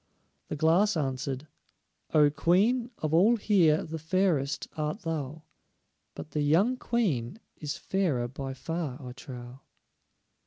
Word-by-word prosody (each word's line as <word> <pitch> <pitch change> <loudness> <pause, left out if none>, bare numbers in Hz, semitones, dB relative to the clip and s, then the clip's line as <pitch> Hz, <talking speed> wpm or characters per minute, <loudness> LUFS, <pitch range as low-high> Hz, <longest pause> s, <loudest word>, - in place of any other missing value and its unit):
The - - -4
Glass 170 +6 +3
answered: 135 -1 -2 0.7
"O 150 -2 +5
Queen, 220 - +2
of 155 0 -2
all 200 +9 +5
here 180 -8 +3
the 160 +1 -6
fairest 160 -5 0
art 155 +7 -2
thou, 155 -2 -4 0.7
But - - -8
the 150 - -1
young 175 - +3
Queen 195 - -1 0.2
is 145 -2 -4
fairer 160 -11 0
by 135 +1 -6
far 160 -2 -4
I 125 -4 -8
trow." 125 -1 -9
155 Hz, 125 wpm, -29 LUFS, 135-185 Hz, 0.7 s, O